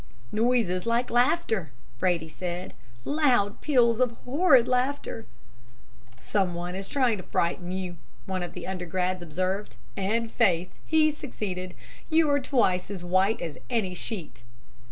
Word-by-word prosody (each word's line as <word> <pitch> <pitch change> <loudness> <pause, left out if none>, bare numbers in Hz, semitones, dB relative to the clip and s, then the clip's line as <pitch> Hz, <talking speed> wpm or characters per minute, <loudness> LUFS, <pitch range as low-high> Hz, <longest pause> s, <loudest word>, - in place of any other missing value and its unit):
"'Noises 225 -4 +1
like 235 +2 +1
laughter!' 240 - +2 0.3
Brady 170 -1 +1
said. 175 +3 -5 0.3
'Loud 255 -9 +2
peals 240 -6 +3
of 255 -1 +4 0.2
horrid 270 -3 +5
laughter.' 255 -2 -1 0.9
"'Someone 180 -1 -1 0.2
trying 255 -6 +2
to 185 - -7
frighten 175 +1 -1
you,' 185 -2 -4 0.3
one 190 -1 -2
of 175 - -5
the - - -6
undergrads 185 0 -2
observed, 185 +5 -2 0.2
'and 225 +4 0
faith, 175 0 +2 0.2
he 315 -1 +4
succeeded. 185 -11 -5 0.3
You 320 -1 +4
are 285 - +4
twice 210 -10 +1
as 190 -4 -6
white 185 +4 +2
as 165 -3 -5
any 220 -7 0
sheet.' 180 - -5
200 Hz, 130 wpm, -27 LUFS, 180-250 Hz, 0.9 s, horrid